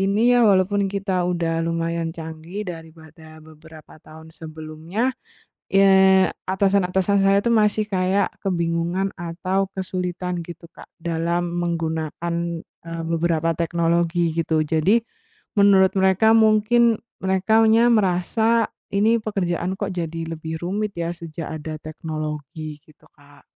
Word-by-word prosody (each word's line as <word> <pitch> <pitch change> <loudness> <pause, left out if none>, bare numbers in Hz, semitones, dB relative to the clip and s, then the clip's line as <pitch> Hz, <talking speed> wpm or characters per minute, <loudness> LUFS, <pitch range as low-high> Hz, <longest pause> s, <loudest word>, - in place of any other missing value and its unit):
ini 205 +5 +3
ya, 245 - +4
walaupun 195 +1 +2
kita 195 -1 -2
udah 165 -2 -1
lumayan 165 0 -2
canggih 165 +5 -7
daripada 160 -2 -11
beberapa 155 0 -15
tahun 160 +1 -14
sebelumnya, 160 +9 -4 0.6
eee, 190 -1 +6 0.2
atasan-atasan 190 0 +1
saya 195 0 +4
itu 235 - -1
masih 215 -1 +2
kayak 190 0 +1 0.2
kebingungan 170 +1 0
atau 185 +3 -2
kesulitan 180 -1 -4
gitu, 170 0 -11
Kak, - - -14
dalam 170 +1 -1
menggunakan, 165 0 -3 0.5
eee, 165 0 -6
beberapa 165 0 0
teknologi, 170 0 0
gitu. 160 -1 0
Jadi, 165 +8 +3 0.6
menurut 195 -2 +5
mereka 190 +4 +4
mungkin 220 +1 +4 0.2
merekanya 220 +5 +3
merasa 220 +3 +2 0.2
ini 215 +4 +3
pekerjaan 185 -4 -2
kok 200 -2 -3
jadi 165 -1 -4
lebih 160 0 -6
rumit 200 +4 -2
ya 170 0 -2
sejak 165 -1 -7
ada 155 0 -6
teknologi, 155 -1 -6
gitu, 155 - -23
Kak. 145 -1 -21
175 Hz, 115 wpm, -22 LUFS, 165-195 Hz, 0.6 s, eee